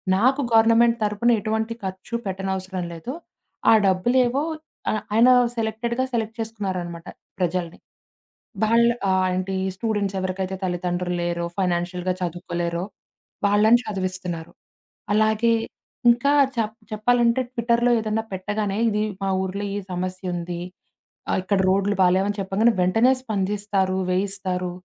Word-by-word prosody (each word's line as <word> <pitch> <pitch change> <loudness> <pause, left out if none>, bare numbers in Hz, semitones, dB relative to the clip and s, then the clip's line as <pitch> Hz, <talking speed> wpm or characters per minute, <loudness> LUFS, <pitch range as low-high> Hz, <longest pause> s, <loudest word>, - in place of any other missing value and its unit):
నాకు 260 +8 +3
గవర్నమెంట్ 230 +1 +5
తరపున 210 +3 +2
ఎటువంటి 220 +1 -1
ఖర్చు 190 +4 -5
పెట్టనవసరం 190 -1 -3
లేదు. 170 +10 -6 0.6
ఆ - - +8
డబ్బులేవో 245 +8 +2 0.5
ఆహ్, 215 - 0
ఆయన 230 +3 +6 0.3
సెలెక్టెడ్‌గా 230 +3 -1
సెలెక్ట్ 225 -1 -2
చేసుకున్నారనమాట 185 -6 -4 0.3
ప్రజల్ని. 175 -1 -2 0.9
వాళ్ళు 235 +2 +4 0.2
ఆహ్, 185 0 +3
ఏంటి 185 +1 -2 0.2
స్టూడెంట్స్ 205 -2 -1
ఎవరికైతే 185 0 -3
తల్లిదండ్రులు 180 0 -2
లేరో, 170 0 -1
ఫైనాన్షియల్‌గా 180 0 0
చదువుకోలేరో. 175 0 -3 0.6
వాళ్ళని 215 +4 +5
చదివిస్తున్నారు. 185 -4 -4 0.6
అలాగే. 220 +2 +3 0.6
ఇంకా 240 +4 +4 0.2
చెప్ 220 -2 -1 0.2
చెప్పాలంటే 235 +3 +2
ట్విట్టర్‌లో 235 0 +1
ఏదన్నా 220 0 -1
పెట్టగానే 205 +1 -2
ఇది 210 -1 0 0.2
మా 195 - 0
ఊర్లో 190 +2 -3
ఈ - - -2
సమస్యుంది. 180 -1 -4 0.7
ఆ! - - +1
ఇక్కడ 195 +1 0
రోడ్లు 200 +2 +2
బాలేమని 190 +3 +3
చెప్పాం 195 +1 -3
గానే, 235 +1 +5
వెంటనే 225 +8 +4
స్పందిస్తారు. 200 -3 -1 0.2
వేయిస్తారు. 185 -1 -1
195 Hz, 115 wpm, -23 LUFS, 185-225 Hz, 0.9 s, ఆ